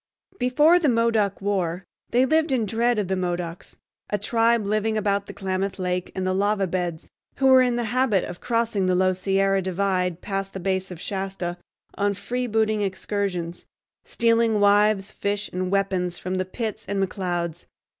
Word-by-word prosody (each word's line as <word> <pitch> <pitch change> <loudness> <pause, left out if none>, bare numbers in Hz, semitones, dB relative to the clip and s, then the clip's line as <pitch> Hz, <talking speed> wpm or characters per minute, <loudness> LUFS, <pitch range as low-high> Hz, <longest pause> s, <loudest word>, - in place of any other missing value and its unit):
Before 295 +8 +4
the 310 -5 +2
Modoc 230 -4 +1
War 185 -3 -1 0.3
they 250 +2 +3
lived 315 +2 +2
in 245 -4 +1
dread 230 +2 +1
of 205 -3 0
the 190 - 0
Modocs, 175 -2 -4 0.3
a 205 - 0
tribe 230 +1 +2
living 215 +1 0
about 200 -1 0
the - - -8
Klamath 190 0 -2
Lake 180 -1 -2
and 185 - -2
the 185 - +1
Lava 200 +1 +1
Beds, 175 -3 -3 0.2
who 270 - -1
were 260 -1 +7
in 250 -1 +2
the 240 - -1
habit 230 -3 +1
of 175 - -7
crossing 230 -5 0
the 185 - +2
low 185 0 +3
Sierra 195 +1 +1
divide 185 -1 0
past 195 0 -4
the 195 - -5
base 190 +1 -1
of 180 -3 -8
Shasta 190 -2 -4 0.4
on 200 0 0
freebooting 220 -2 0
excursions, 190 -3 -3 0.4
stealing 230 -2 +2
wives, 205 -1 +3
fish, 205 0 -3
and 185 0 -2
weapons 185 -3 0
from 185 +1 -3
the 185 - 0
Pitts 220 +2 -4
and 200 0 -1
McClouds. 175 -3 -3
200 Hz, 170 wpm, -24 LUFS, 185-225 Hz, 0.4 s, were